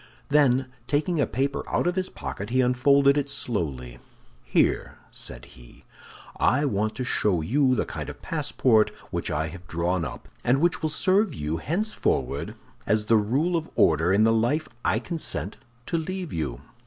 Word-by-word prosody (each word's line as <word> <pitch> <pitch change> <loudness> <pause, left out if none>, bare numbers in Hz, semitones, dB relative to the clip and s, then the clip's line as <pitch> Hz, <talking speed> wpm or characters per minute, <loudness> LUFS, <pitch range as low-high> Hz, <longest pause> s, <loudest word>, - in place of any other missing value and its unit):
Then 135 -3 +4 0.2
taking 150 +2 +1
a - - +2
paper 135 +1 -1
out - - 0
of 175 0 +1
his 185 -1 -1
pocket, 100 +2 -6
he 130 +2 +1
unfolded 140 +3 +4
it 140 0 -3
slowly. 70 - -3 0.4
"Here," - - +1
said - - -6
he, - - -17 0.5
"I 145 +3 +3
want 110 -4 0
to 130 - -3
show 105 -8 +1
you 130 - +2
the - - 0
kind - - -6
of - - -9
passport 110 -4 +2 0.2
which - - -2
I 80 +1 -1
have 90 +1 -11
drawn 85 +1 -1
up, - - -7 0.2
and 125 +3 +3
which 170 +2 +1
will 155 - 0
serve 190 +6 +2
you 75 +2 -2
henceforward 185 - -1 0.3
as 105 0 +2
the 115 +1 +4
rule 135 +12 +1
of 165 -1 -2
order 80 +3 +3
in 100 +3 +4
the 115 0 +4
life 120 +8 +1 0.2
I - - +2
consent 165 +7 -4 0.3
to 170 - -1
leave 185 0 -4
you." 70 -6 -3
125 Hz, 170 wpm, -25 LUFS, 90-150 Hz, 0.5 s, Then